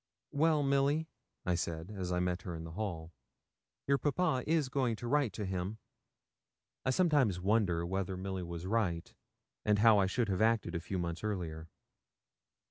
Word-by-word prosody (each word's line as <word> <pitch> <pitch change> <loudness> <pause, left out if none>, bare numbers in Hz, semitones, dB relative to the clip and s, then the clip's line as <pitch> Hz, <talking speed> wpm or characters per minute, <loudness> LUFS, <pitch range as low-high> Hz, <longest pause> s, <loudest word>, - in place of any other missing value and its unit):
'Well, 155 0 +3
Milly,' 140 +3 +2 0.4
I 90 - +2
said, 85 +1 -3
as 95 -3 -4
I 90 - +1
met 90 0 0
her 90 -3 -5
in 80 - -6
the 80 - -7
hall, 85 -4 -4 0.7
'your 140 0 +2
papa 145 -4 +1
is 155 -3 +2
going 130 -3 0
to 120 +2 -6
write 140 -3 +2
to 105 +1 -4
him.' 95 +3 -3 1.1
I - - 0
sometimes 135 - +3
wonder 95 -4 +2
whether 95 +1 -2
Milly 95 0 -3
was 85 0 -6
right, 95 -5 -1 0.5
and 105 -1 +3
how 110 0 +6
I 95 - +3
should 115 +2 0
have 95 +1 0
acted 110 -5 +2
a 85 - -1
few 95 +3 -4
months 85 0 -3
earlier. 85 -6 -3
100 Hz, 170 wpm, -33 LUFS, 90-130 Hz, 1.1 s, how